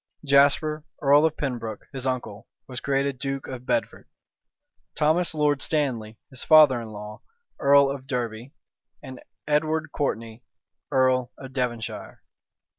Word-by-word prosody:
Jasper, 145 Hz, +2 st, +3 dB, 0.2 s
earl 145 Hz, +2 st, +5 dB
of 160 Hz, -, -6 dB
Pembroke, 120 Hz, -6 st, -4 dB
his 135 Hz, -1 st, -4 dB
uncle, 120 Hz, -4 st, -4 dB, 0.2 s
was 125 Hz, -2 st, -6 dB
created 140 Hz, -1 st, -1 dB
duke 135 Hz, 0 st, -4 dB
of 125 Hz, -1 st, -8 dB
Bedford; 295 Hz, -, -2 dB, 0.9 s
Thomas 160 Hz, +2 st, +1 dB
Lord 145 Hz, -2 st, +1 dB
Stanley, 120 Hz, -8 st, -2 dB
his 130 Hz, -, -5 dB
father 150 Hz, -6 st, +6 dB
in 115 Hz, -, -8 dB
law, 105 Hz, 0 st, -9 dB, 0.4 s
earl 140 Hz, 0 st, +5 dB
of 135 Hz, -1 st, -5 dB
Derby; 120 Hz, -1 st, -4 dB, 0.5 s
and 130 Hz, -2 st, -9 dB, 0.3 s
Edward 155 Hz, +1 st, 0 dB
Courtney, 115 Hz, -5 st, -3 dB, 0.5 s
earl 130 Hz, -1 st, +2 dB
of 135 Hz, -1 st, -10 dB
Devonshire. 120 Hz, -3 st, -4 dB
135 Hz, 125 wpm, -25 LUFS, 120-145 Hz, 0.9 s, father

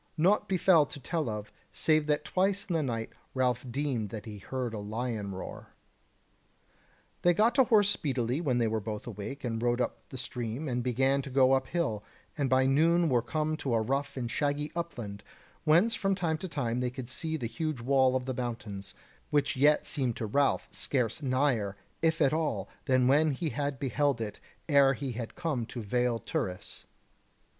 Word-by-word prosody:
Naught 185 Hz, +7 st, +3 dB
befell 185 Hz, -3 st, +5 dB
to -, -, -8 dB
tell 155 Hz, 0 st, -2 dB
of, 105 Hz, -1 st, -5 dB, 0.2 s
save 155 Hz, -1 st, +2 dB
that 150 Hz, 0 st, +1 dB
twice 195 Hz, +1 st, +1 dB
in 180 Hz, -, -3 dB
the 165 Hz, -, +2 dB
night 115 Hz, -5 st, -3 dB, 0.2 s
Ralph 125 Hz, -2 st, +1 dB
deemed 130 Hz, -5 st, -1 dB
that 105 Hz, 0 st, -7 dB
he 105 Hz, -2 st, -8 dB
heard 125 Hz, +2 st, -4 dB
a 110 Hz, -, -4 dB
lion 110 Hz, 0 st, -3 dB
roar. 95 Hz, -, -8 dB, 1.5 s
They 175 Hz, -1 st, +4 dB
got 225 Hz, +5 st, +4 dB
to 265 Hz, -3 st, +5 dB
horse 210 Hz, -4 st, +4 dB
speedily 130 Hz, -, -1 dB
when 130 Hz, -7 st, +1 dB
they 120 Hz, -, +2 dB
were 110 Hz, 0 st, 0 dB
both 105 Hz, 0 st, -5 dB
awake, 120 Hz, +5 st, -6 dB
and 115 Hz, -2 st, -2 dB
rode 120 Hz, 0 st, +1 dB
up 125 Hz, -, -3 dB
the 130 Hz, -, -7 dB
stream, 125 Hz, +3 st, -4 dB
and 125 Hz, -2 st, -1 dB
began 130 Hz, +3 st, +2 dB
to 140 Hz, -, -8 dB
go 130 Hz, 0 st, +4 dB
up 135 Hz, -, +2 dB
hill, 145 Hz, -12 st, -1 dB, 0.3 s
and 140 Hz, -3 st, 0 dB
by 130 Hz, +1 st, +4 dB
noon 165 Hz, +5 st, +4 dB
were 125 Hz, -3 st, +3 dB
come 155 Hz, +6 st, -1 dB
into 140 Hz, -6 st, -1 dB
a 115 Hz, -, +2 dB
rough 140 Hz, +4 st, -2 dB
and 120 Hz, -2 st, -3 dB
shaggy 145 Hz, 0 st, -1 dB
upland, 120 Hz, -12 st, -5 dB, 0.4 s
whence 175 Hz, +9 st, +5 dB
from 195 Hz, -4 st, +1 dB
time 165 Hz, -4 st, -1 dB
to 190 Hz, -, -4 dB
time 125 Hz, -7 st, -1 dB
they 125 Hz, 0 st, 0 dB
could 125 Hz, 0 st, -7 dB
see 160 Hz, +5 st, -2 dB
the 125 Hz, -, -4 dB
huge 145 Hz, +5 st, -3 dB
wall 130 Hz, +1 st, +3 dB
of 130 Hz, -1 st, -1 dB
the 130 Hz, -, -2 dB
mountains, 115 Hz, -5 st, -5 dB, 0.3 s
which 145 Hz, -1 st, +1 dB
yet 145 Hz, +3 st, +4 dB
seemed 130 Hz, -5 st, -1 dB
to 115 Hz, -, -3 dB
Ralph 140 Hz, +6 st, +1 dB
scarce 125 Hz, -1 st, -1 dB
nigher, 130 Hz, -7 st, +1 dB, 0.2 s
if 160 Hz, 0 st, +2 dB
at 140 Hz, -, +3 dB
all, 145 Hz, -12 st, -1 dB, 0.2 s
than 130 Hz, -2 st, +3 dB
when 150 Hz, +3 st, +4 dB
he 155 Hz, +4 st, -2 dB
had 140 Hz, +2 st, -2 dB
beheld 140 Hz, -1 st, +1 dB
it 105 Hz, -2 st, -5 dB, 0.3 s
ere 140 Hz, -3 st, +5 dB
he 135 Hz, 0 st, -4 dB
had 115 Hz, -1 st, -6 dB
come 160 Hz, -8 st, -1 dB
to 120 Hz, -, -6 dB
Vale 120 Hz, +2 st, 0 dB
Turris. 90 Hz, -4 st, -4 dB
130 Hz, 190 wpm, -30 LUFS, 120-155 Hz, 1.5 s, befell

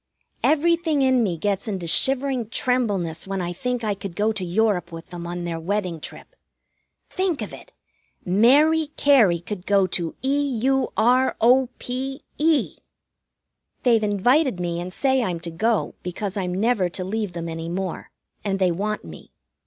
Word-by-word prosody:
Everything 320 Hz, -1 st, +2 dB
in 260 Hz, -2 st, +3 dB
me 185 Hz, -7 st, 0 dB
gets 200 Hz, +4 st, -1 dB
into 190 Hz, -5 st, -3 dB
shivering 260 Hz, +5 st, +2 dB
trembleness 205 Hz, -11 st, 0 dB
when 195 Hz, 0 st, -3 dB
I 175 Hz, -1 st, -3 dB
think 245 Hz, +5 st, -3 dB
I 210 Hz, -2 st, 0 dB
could 195 Hz, -3 st, -8 dB
go 210 Hz, +3 st, +1 dB
to 210 Hz, -4 st, -4 dB
Europe 185 Hz, 0 st, 0 dB
with 165 Hz, 0 st, -10 dB
them 170 Hz, -1 st, -6 dB
on 175 Hz, 0 st, -4 dB
their 170 Hz, -1 st, -3 dB
wedding 180 Hz, -1 st, -2 dB
trip. -, -, -9 dB, 0.8 s
Think 370 Hz, -5 st, 0 dB
of -, -, -8 dB
it! -, -, -12 dB, 0.5 s
Mary 285 Hz, -, +4 dB
Cary 230 Hz, -12 st, +5 dB
could 180 Hz, +2 st, -7 dB
go 200 Hz, -1 st, +4 dB
to 170 Hz, -2 st, -3 dB
E 280 Hz, -1 st, 0 dB
U 270 Hz, -1 st, +2 dB
R 250 Hz, +4 st, +3 dB
O 250 Hz, +2 st, +4 dB
P 265 Hz, +3 st, -4 dB, 0.2 s
E! 310 Hz, -1 st, +2 dB, 1.1 s
They've 235 Hz, -3 st, +4 dB
invited 245 Hz, -, +2 dB
me 170 Hz, -1 st, -2 dB
and 180 Hz, +1 st, -6 dB
say 265 Hz, +5 st, +1 dB
I'm 180 Hz, -7 st, -2 dB
to 170 Hz, 0 st, -5 dB
go, 215 Hz, +5 st, 0 dB
because 185 Hz, +2 st, -4 dB
I'm 180 Hz, -3 st, -2 dB
never 215 Hz, -5 st, +2 dB
to 185 Hz, +1 st, -4 dB
leave 205 Hz, 0 st, -3 dB
them 170 Hz, -1 st, -5 dB
any 165 Hz, 0 st, -5 dB
more, 185 Hz, 0 st, -4 dB, 0.3 s
and 195 Hz, -2 st, -1 dB
they 185 Hz, -2 st, +2 dB
want 210 Hz, +5 st, -3 dB
me. 80 Hz, -2 st, -11 dB
210 Hz, 170 wpm, -23 LUFS, 180-260 Hz, 1.1 s, Cary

